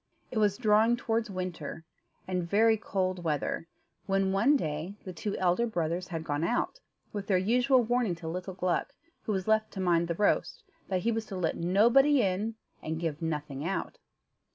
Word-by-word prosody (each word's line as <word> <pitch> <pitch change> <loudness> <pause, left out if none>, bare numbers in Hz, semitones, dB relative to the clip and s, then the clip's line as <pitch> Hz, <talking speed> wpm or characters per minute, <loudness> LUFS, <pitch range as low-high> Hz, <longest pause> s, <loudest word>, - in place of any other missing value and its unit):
It 225 - -1
was 205 -2 +2
drawing 225 0 +4
towards 230 -1 -1
winter, 180 -4 -5 0.4
and 180 -1 -1
very 220 +3 +5
cold 185 -4 -2
weather, 155 +1 -1 0.4
when 195 -1 +2
one 230 +10 +4
day 155 - -4
the 185 - -7
two 200 +4 -3
elder 185 +6 +2
brothers 175 -3 -2
had 165 -3 -4
gone 145 0 -2
out, 245 - 0 0.3
with 205 -2 -4
their 190 - +3
usual 245 +6 +3
warning 235 -5 +1
to 165 -1 -8
little 180 +3 -4
Gluck, 180 -2 -1 0.3
who - - -1
was 190 -1 -2
left 220 0 +3
to 195 - -6
mind 170 -2 +2
the 170 - -2
roast, 205 +3 +1 0.2
that 185 -2 0
he 235 - +1
was 225 -1 -2
to 195 - -6
let 175 -3 0
nobody 235 +11 +4
in, 200 +4 -1 0.3
and 160 +1 -3
give 165 -2 -3
nothing 150 -3 -3
out. 190 +4 -3
190 Hz, 180 wpm, -29 LUFS, 170-220 Hz, 0.4 s, very